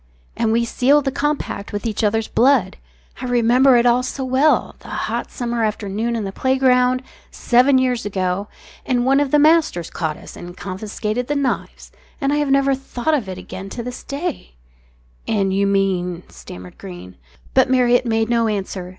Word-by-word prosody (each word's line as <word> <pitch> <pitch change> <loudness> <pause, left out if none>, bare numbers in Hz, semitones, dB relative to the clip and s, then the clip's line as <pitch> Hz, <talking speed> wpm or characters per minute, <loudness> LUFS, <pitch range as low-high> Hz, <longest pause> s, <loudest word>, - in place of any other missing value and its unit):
And 225 - 0
we 235 +1 +2
sealed 280 +5 +2
the 270 - 0
compact 285 -7 -3
with 205 +1 -4
each 225 0 -2
other's 220 +1 +1
blood. 240 -7 +2 0.4
I - - -4
remember 245 +2 +4
it 235 - +2
all 245 +1 +4
so 265 +1 -4
well 265 +4 +2
the - - -15
hot - - -3
summer 235 -2 -2
afternoon 215 +2 -2
in 225 - -2
the 195 - -4
playground, 255 +1 +2 0.3
seven 255 +3 +3
years 250 -2 +1
ago 190 0 -2 0.4
and 245 -2 0
one 270 +2 +4
of 290 -1 +1
the 295 - +4
masters 300 - +3
caught 155 -2 -3
us - - -12
and 175 +1 -10
confiscated 210 +5 -4
the 290 - -1
knives 280 -2 -3 0.3
and 275 +1 0
I - - +1
have 295 -1 0
never 275 0 +3
thought 270 +2 -2
of 245 -10 -1
it 185 - -6
again 190 +1 -8
to 235 - -6
this 250 +1 -7
day 285 - -5 0.3
" - - -35
"And 195 -1 +1
you 200 +1 +2
mean 185 -3 0
" - - -29
stammered 90 0 -12
Greene. 90 0 -10 0.4
But 260 -1 +4
Marriott 250 -1 +3
made 225 -1 +1
no 230 -1 +2
answer. 190 -3 -3
235 Hz, 185 wpm, -20 LUFS, 195-260 Hz, 0.4 s, remember